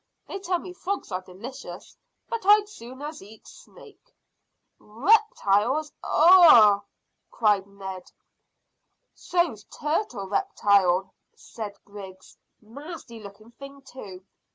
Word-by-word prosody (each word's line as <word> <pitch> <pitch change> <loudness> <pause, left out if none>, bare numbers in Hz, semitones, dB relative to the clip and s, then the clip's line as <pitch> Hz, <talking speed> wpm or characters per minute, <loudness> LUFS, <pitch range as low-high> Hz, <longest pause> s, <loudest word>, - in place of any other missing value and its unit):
They 395 - -6
tell 370 -1 -1
me 360 +1 -10
frogs 380 - -5
are 185 0 -3
delicious, 225 +10 -11 0.3
but 465 -1 -4
I'd 415 +2 +6
as 420 +1 -17
soon 255 - -11 0.2
eat 215 +3 -16
snake." - - -17 0.7
"Reptiles! 270 - +1
Ugh!" 305 - +7 0.5
cried 205 -3 +1
Ned. 190 -2 -9 1.0
"So's 345 - -2
turtle 300 - -3
reptile," 195 - +1 0.2
said 215 -3 -9
Griggs. 190 -2 -12 0.3
"Nasty 270 0 -10
looking 215 +2 -14
thing 275 +2 -13
too. 195 -9 -12
230 Hz, 105 wpm, -25 LUFS, -, 1.0 s, Ugh